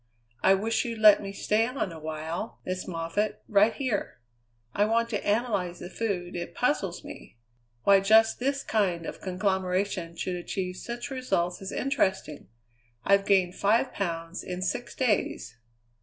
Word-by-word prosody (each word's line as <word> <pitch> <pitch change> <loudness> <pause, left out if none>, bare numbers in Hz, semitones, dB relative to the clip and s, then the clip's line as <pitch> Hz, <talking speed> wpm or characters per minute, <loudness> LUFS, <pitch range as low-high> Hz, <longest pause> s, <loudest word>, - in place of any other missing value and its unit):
I 195 - +6
wish 220 +3 0
you'd 230 -1 -4
let 215 -1 +7
me 195 -1 -5
stay 215 +3 +1
on 250 -7 -3
a 165 - -9
while, 160 +6 -5
Miss 185 0 -3
Moffatt, 170 +5 -2
right 210 +2 +5
here. 240 - -2 0.5
I 205 - +2
want 230 +2 +1
to 210 -3 -2
analyze 205 -5 0
the 175 +2 -9
food, 180 -3 -3
it 175 0 -5
puzzles - - 0
me. - - -11 0.5
Why 200 -1 +6
just 220 +3 +4
this 275 +2 -1
kind 180 -6 0
of - - -7
conglomeration 185 -2 -1
should 180 +1 -3
achieve 180 +1 -4
such 240 +5 -6
results 195 -10 -1
is 195 - -5
interesting. 190 - -1 0.6
I've 200 0 +4
gained 185 -3 +3
five 225 +7 +2
pounds 170 -2 -3
in 180 0 -4
six 240 +6 -3
days." 205 - 0
195 Hz, 155 wpm, -28 LUFS, 180-220 Hz, 0.6 s, let